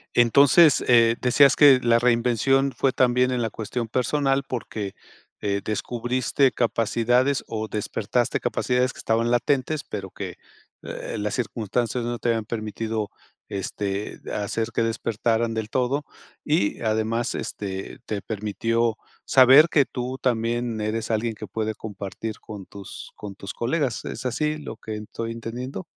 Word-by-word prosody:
Entonces, 140 +6 +6
eh, 115 -2 +5
decías 135 +2 +5
que 140 -3 +7
la 115 -1 +4
reinvención 125 +3 +2
fue 135 - +2
también 125 0 +3
en 125 -1 0
la 115 - 0
cuestión 115 +2 -4
personal, 135 +3 +1
porque, 110 -5 -5 0.5
eh, 100 -1 -1
descubriste 125 +4 0
capacidades 120 +3 +1
o 110 -1 -3
despertaste 110 +3 -1
capacidades 125 +2 0
que - - -14
estaban 115 +1 +1
latentes, 130 +5 +1
pero 100 -2 -6
que, - - -7 0.5
eh, - - -6
las 105 0 -2
circunstancias 120 0 -2
no 120 0 -2
te 120 - -1
habían 115 -2 0
permitido, 110 -1 -3 0.4
este, 100 0 -4
hacer 105 +2 -2
que - - +1
despertaran 115 0 0
del 110 -1 -3
todo, 130 +4 0 0.4
y 150 -10 0
además, 110 +1 0
este, 95 -2 -5
te 105 -2 -3
permitió 115 +2 -1 0.3
saber 135 +4 +7
que 145 -4 +4
tú 125 +1 -4
también 120 -2 0
eres 110 +1 -2
alguien 110 +1 0
que 110 - -8
puede 110 +2 -3
compartir 105 +1 -6
con 105 -3 -9
tus 100 0 -10
con 100 -2 -8
tus 100 0 -7
colegas. 130 0 -1
¿Es - - -6
así 150 +5 0
lo 130 -7 -8
que 110 -1 -6
en 105 - -6
estoy 115 +2 -5
entendiendo? 115 -1 -6
115 Hz, 145 wpm, -24 LUFS, 110-125 Hz, 0.5 s, que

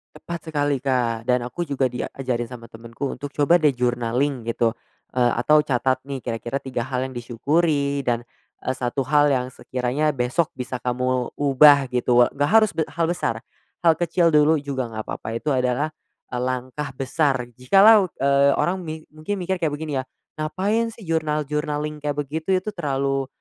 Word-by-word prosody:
Tepat 170 -1 -7
sekali 145 -3 0
Kak, 120 -4 -1
dan 125 -1 +2
aku 170 +8 -4
juga 135 -3 0
diajarin 125 -1 -3
sama 115 -1 -11
temenku 115 +4 -6
untuk, 145 0 -7
"Coba 160 +4 +4
deh 150 -4 +3
journaling 125 +1 -1
gitu." 115 0 +1 0.4
Eee, 125 -1 +2
atau, 150 +3 +5
"Catat 130 -3 +1
nih, 135 -3 -5
kira-kira 120 +2 -4
3 130 -2 -3
hal 130 -1 -1
yang 130 - -5
disyukuri 140 +4 0
dan, 120 -3 -1 0.4
eee, - - 0
1 130 +1 -2
hal 145 +2 +4
yang 130 -2 0
sekiranya 130 +5 -1
besok 130 +7 0
bisa 125 0 -5
kamu 125 0 -1
ubah." 140 -1 +5
Gitu, 125 0 +1
we 120 0 +5
nggak 145 +1 0
harus 215 +4 +5
be 160 - -2
hal 165 0 -1
besar, 115 -9 -2 0.4
hal 165 - +7
kecil 170 0 +2
dulu 150 +1 +5
juga 140 -4 -3
nggak 110 -1 -6
papa, 110 +1 -5
itu 145 +6 -2
adalah 130 +3 0 0.4
langkah 130 +3 -3
besar 135 0 0
jikalau, 195 - +6
eee, 140 0 +3
orang 185 +2 0
ming 160 -3 -7
mungkin 155 +6 -4
mikir 190 -1 -2
kayak 160 -3 0
begini 150 -2 -3
ya, - - -2 0.4
"Ngapain 210 +9 -1
sih 225 - -13
journal-journaling 150 -2 -2
kayak 145 -1 -2
begitu? 155 +6 -1
Itu 185 +3 -2
terlalu, 135 -6 -1
140 Hz, 170 wpm, -23 LUFS, 125-155 Hz, 0.4 s, hal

